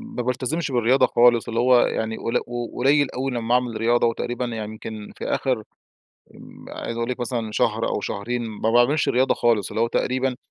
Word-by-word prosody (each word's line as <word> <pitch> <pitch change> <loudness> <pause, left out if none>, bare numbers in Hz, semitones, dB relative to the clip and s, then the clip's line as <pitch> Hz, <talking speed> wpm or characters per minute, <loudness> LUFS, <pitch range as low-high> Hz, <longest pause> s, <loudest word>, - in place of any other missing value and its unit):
ما 125 - -1
بالتزمش 130 +5 -2
بالرياضة 125 +2 +3
خالص، 120 -1 +4
اللي 115 0 -2
هو 125 0 +5
يعني 110 0 -1
قل 115 - -1 0.4
قليل 140 +2 +3
أوي 135 +1 -3
لمّا 120 0 -1
أعمل 120 -3 0
رياضة، 120 +1 +2
وتقريبًا 120 +1 -2
يعني 110 -3 -5
يمكن 110 -1 -8
في - - -6
آخر 125 -5 -1 0.7
آمم، - - -14
عايز 115 - -6
أقول 115 +1 -2
لِك 125 0 -4
مثلًا 115 -2 -3
شهر 110 +1 0
أو - - -1
شهرين 120 +6 -3
ما 110 +1 -2
باعملش 120 +6 +3
رياضة 130 +2 +2
خالص، 115 -5 +1
اللي - - -3
هو 115 - +3
تقريبًا 130 +1 -1
120 Hz, 190 wpm, -23 LUFS, 115-125 Hz, 0.7 s, هو